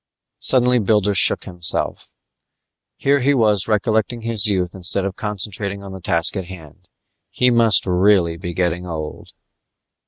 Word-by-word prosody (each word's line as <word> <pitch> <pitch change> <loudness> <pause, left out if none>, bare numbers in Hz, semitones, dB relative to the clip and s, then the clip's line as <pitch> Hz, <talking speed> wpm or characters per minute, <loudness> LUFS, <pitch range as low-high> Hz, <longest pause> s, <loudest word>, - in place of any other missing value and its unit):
Suddenly 125 -1 +3
Builder 105 -1 +1
shook - - +3
himself. 85 -3 -3 0.8
Here 140 +1 +1
he 140 +2 +1
was 105 -5 +1
recollecting 110 +2 -1
his 115 -2 0
youth 90 -3 -2
instead 95 +1 +2
of 95 -1 -5
concentrating 100 -1 -3
on 100 - -10
the 95 -1 -10
task 85 +2 +2
at 95 -3 -4
hand. 85 -5 -14 0.4
He 125 0 +1
must 115 -5 +3
really 90 -2 +2
be 85 0 -8
getting 90 0 -2
old. 80 -3 -7
100 Hz, 145 wpm, -19 LUFS, 90-110 Hz, 0.8 s, Suddenly